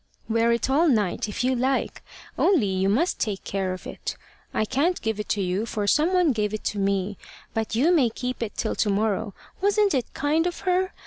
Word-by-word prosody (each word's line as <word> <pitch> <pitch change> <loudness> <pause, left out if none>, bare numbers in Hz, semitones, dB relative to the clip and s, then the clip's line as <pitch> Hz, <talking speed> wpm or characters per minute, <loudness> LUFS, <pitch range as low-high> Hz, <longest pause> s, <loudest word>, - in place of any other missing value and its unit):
'Wear 230 +1 +2
it 235 +2 +1
all 295 +6 +3
night, 210 -4 +1
if 210 - -3
you 260 +1 +2
like. 260 +2 -1 0.3
Only 345 - +3
you 190 0 +1
must 295 - +1
take 205 -4 -2
care 190 -1 -2
of 185 - -7
it. - - -5 0.3
I 215 - 0
can't 290 +10 +1
give 220 -2 -1
it 210 - -1
you, 195 +3 -1
for 210 -2 -2
some 305 - +3
one 360 -4 +3
gave 215 -3 -1
it 215 - -7
to 205 - -4
me; 195 0 -1 0.3
but 220 -1 -2
you 285 +9 +3
may 275 -9 +4
keep 250 +3 -5
it 225 -3 -3
till 220 - -1
to 210 - 0
morrow.' 205 0 0 0.3
Wasn't 405 0 +3
it 255 -4 -1
kind 310 +4 +1
of 350 - -4
her? 370 +1 +1
230 Hz, 210 wpm, -25 LUFS, 205-300 Hz, 0.3 s, may